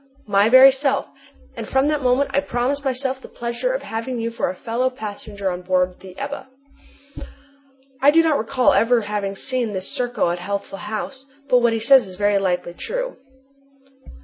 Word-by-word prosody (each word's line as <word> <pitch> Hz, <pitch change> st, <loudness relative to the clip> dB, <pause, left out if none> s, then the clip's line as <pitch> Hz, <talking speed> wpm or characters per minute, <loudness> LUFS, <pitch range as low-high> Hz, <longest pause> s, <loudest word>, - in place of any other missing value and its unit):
"My 205 Hz, +1 st, +3 dB
very 260 Hz, +2 st, +9 dB
self, 275 Hz, +1 st, 0 dB, 0.5 s
and -, -, -6 dB
from 265 Hz, +2 st, +2 dB
that 300 Hz, -1 st, 0 dB
moment 255 Hz, +2 st, +2 dB
I 280 Hz, -, +3 dB
promised 280 Hz, 0 st, -2 dB
myself 265 Hz, 0 st, -2 dB
the -, -, -11 dB
pleasure 235 Hz, -, -3 dB
of -, -, -3 dB
having 230 Hz, +2 st, -4 dB
you 230 Hz, 0 st, -2 dB
for 230 Hz, -, -2 dB
a 185 Hz, -, -5 dB
fellow 235 Hz, +6 st, -1 dB
passenger 205 Hz, -4 st, -5 dB
on 180 Hz, 0 st, -5 dB
board 180 Hz, 0 st, 0 dB
the 185 Hz, -1 st, -13 dB
Ebba." 280 Hz, 0 st, -5 dB, 1.5 s
I 280 Hz, -, +6 dB
do 330 Hz, +3 st, +5 dB
not 315 Hz, -3 st, +2 dB
recall 250 Hz, +3 st, +2 dB
ever 235 Hz, +1 st, +3 dB
having 205 Hz, -2 st, -3 dB
seen 245 Hz, -1 st, -2 dB
this 190 Hz, 0 st, -4 dB
Serko 245 Hz, -8 st, -1 dB
at 175 Hz, -, -3 dB
Healthful 200 Hz, +1 st, -5 dB
House, 260 Hz, +7 st, -6 dB, 0.2 s
but 250 Hz, -2 st, +5 dB
what 235 Hz, -1 st, +2 dB
he 225 Hz, -, -1 dB
says 245 Hz, 0 st, +5 dB
is 185 Hz, -, -10 dB
very 205 Hz, +1 st, +2 dB
likely 180 Hz, -2 st, -1 dB
true. -, -, -4 dB
240 Hz, 180 wpm, -21 LUFS, 200-270 Hz, 1.5 s, very